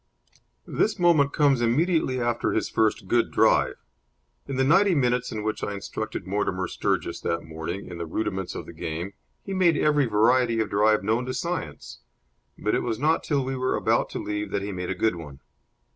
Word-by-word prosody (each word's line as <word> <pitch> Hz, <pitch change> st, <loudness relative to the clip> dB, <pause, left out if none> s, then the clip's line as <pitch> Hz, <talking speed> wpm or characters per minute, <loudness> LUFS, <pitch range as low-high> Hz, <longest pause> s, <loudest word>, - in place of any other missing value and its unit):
This 215 Hz, -, 0 dB
moment 165 Hz, -6 st, +4 dB
comes 140 Hz, -5 st, +3 dB
immediately 130 Hz, +2 st, +1 dB
after 120 Hz, -1 st, 0 dB
his -, -, -1 dB
first 110 Hz, -3 st, +1 dB
good 120 Hz, +3 st, +2 dB
drive. -, -, +3 dB, 0.7 s
In 140 Hz, -, -4 dB
the 130 Hz, -, +2 dB
ninety 185 Hz, +7 st, +4 dB
minutes 125 Hz, -3 st, +1 dB
in 110 Hz, -1 st, -4 dB
which 110 Hz, 0 st, -3 dB
I 105 Hz, -, -2 dB
instructed 105 Hz, +2 st, -5 dB
Mortimer 95 Hz, -2 st, -1 dB
Sturgis -, -, -2 dB
that 85 Hz, 0 st, -2 dB
morning 80 Hz, +4 st, -6 dB
in 85 Hz, -1 st, -8 dB
the 85 Hz, -, -4 dB
rudiments 95 Hz, +1 st, -3 dB
of -, -, -6 dB
the -, -, -10 dB
game, 85 Hz, +5 st, -5 dB, 0.3 s
he 195 Hz, -, -5 dB
made 175 Hz, -4 st, +3 dB
every 150 Hz, -3 st, +3 dB
variety 115 Hz, +2 st, +3 dB
of 110 Hz, -, -1 dB
drive 105 Hz, 0 st, +3 dB
known 115 Hz, +5 st, 0 dB
to 130 Hz, -, -3 dB
science; 170 Hz, -, -4 dB, 0.6 s
but -, -, -1 dB
it -, -, +2 dB
was 110 Hz, -, -2 dB
not 155 Hz, +6 st, +1 dB
till 140 Hz, -4 st, 0 dB
we 135 Hz, 0 st, -2 dB
were 130 Hz, 0 st, 0 dB
about -, -, +1 dB
to -, -, -5 dB
leave 105 Hz, 0 st, -3 dB
that 100 Hz, 0 st, -2 dB
he 100 Hz, -, -4 dB
made 90 Hz, -1 st, -4 dB
a 95 Hz, -, -1 dB
good 90 Hz, 0 st, +1 dB
one. 75 Hz, -5 st, -10 dB
115 Hz, 195 wpm, -25 LUFS, 100-140 Hz, 0.7 s, moment